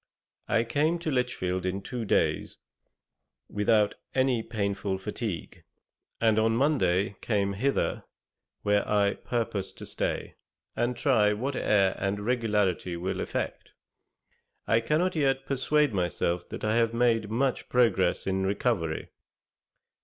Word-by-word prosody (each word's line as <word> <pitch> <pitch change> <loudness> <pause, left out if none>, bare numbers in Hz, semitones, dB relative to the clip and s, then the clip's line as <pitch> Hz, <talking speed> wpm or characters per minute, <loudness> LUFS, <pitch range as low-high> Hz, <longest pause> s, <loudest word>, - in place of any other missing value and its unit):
I 115 0 +2
came 150 +8 +1
to 165 -2 -3
Lichfield 95 -8 -1
in 95 +2 -2
two 120 0 -4
days - - 0 0.9
without 105 0 +2 0.2
any 130 -3 +2
painful 100 -3 -2
fatigue, 100 -2 -5 0.6
and 110 -1 +3
on 110 +1 +2
Monday 100 - +2
came 100 -3 0
hither, 135 +8 0 0.6
where 105 0 +3
I 100 -1 +3
purpose 110 -5 -3
to - - -10
stay: - - -3 0.4
and 120 +1 0
try 110 -6 +3
what 130 +6 -3
air 100 -5 +3
and 100 +1 -1
regularity 105 -6 0
will 90 +2 -3
effect. - - -4 0.9
I 115 - +3
cannot 155 +10 +1
yet 135 -3 +1
persuade 140 0 +1
myself 90 -1 -1
that - - -7
I 110 +1 +2
have 115 0 +2
made 115 -3 +2
much 125 +4 -1
progress 100 -8 +2
in 95 0 0
recovery. 95 -5 -1
110 Hz, 125 wpm, -28 LUFS, 100-125 Hz, 0.9 s, and